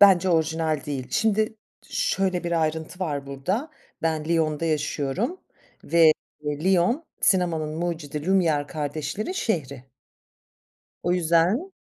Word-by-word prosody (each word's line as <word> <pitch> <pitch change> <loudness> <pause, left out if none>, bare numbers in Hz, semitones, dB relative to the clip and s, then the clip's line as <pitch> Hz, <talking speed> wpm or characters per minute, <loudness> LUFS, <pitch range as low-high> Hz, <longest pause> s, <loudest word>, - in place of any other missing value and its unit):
Bence 190 -2 +7
orijinal 160 -2 +1
değil. 135 -3 -3
Şimdi 220 0 +1 0.3
şöyle 185 -2 0
bir 170 -1 +1
ayrıntı 160 +3 -2
var 145 -6 -2
burada, 185 - -2 0.3
ben 160 -2 0
Lyon'da 160 -1 +1
yaşıyorum 155 - -1 0.4
ve 165 -2 +6 0.3
Lyon, 180 - +2 0.2
sinemanın 165 -5 +1
mucidi 160 -3 -3
Lumiere 165 -7 +2
kardeşlerin 155 - -3
şehri. 140 - -2 1.2
O 175 - +1
yüzden 180 - +2
165 Hz, 105 wpm, -25 LUFS, 150-190 Hz, 1.2 s, Bence